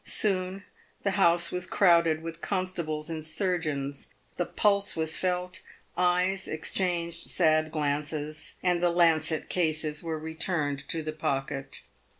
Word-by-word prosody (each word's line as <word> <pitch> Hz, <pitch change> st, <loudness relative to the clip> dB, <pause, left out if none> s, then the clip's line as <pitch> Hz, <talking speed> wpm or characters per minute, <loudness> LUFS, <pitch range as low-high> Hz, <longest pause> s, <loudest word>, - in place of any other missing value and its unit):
Soon 190 Hz, -1 st, +2 dB, 0.4 s
the 200 Hz, -, +1 dB
house 175 Hz, -3 st, +4 dB
was 180 Hz, 0 st, -1 dB
crowded 170 Hz, -4 st, +4 dB
with 165 Hz, 0 st, -7 dB
constables 170 Hz, -5 st, -2 dB
and 160 Hz, -1 st, -4 dB
surgeons. 155 Hz, -5 st, -2 dB, 0.2 s
The 175 Hz, -, -1 dB
pulse 200 Hz, -1 st, +2 dB
was 160 Hz, 0 st, 0 dB
felt; 180 Hz, 0 st, -1 dB, 0.3 s
eyes 180 Hz, +2 st, +2 dB
exchanged 170 Hz, +1 st, -1 dB
sad 155 Hz, -2 st, +3 dB
glances; 150 Hz, 0 st, -2 dB
and 180 Hz, -1 st, +2 dB
the 175 Hz, -, +3 dB
lancet 165 Hz, -2 st, +2 dB
cases 155 Hz, -3 st, 0 dB
were 165 Hz, -2 st, -3 dB
returned 160 Hz, -2 st, -2 dB
to 165 Hz, -1 st, -2 dB
the 155 Hz, 0 st, -4 dB
pocket. 135 Hz, -2 st, -3 dB
165 Hz, 130 wpm, -28 LUFS, 155-180 Hz, 0.4 s, house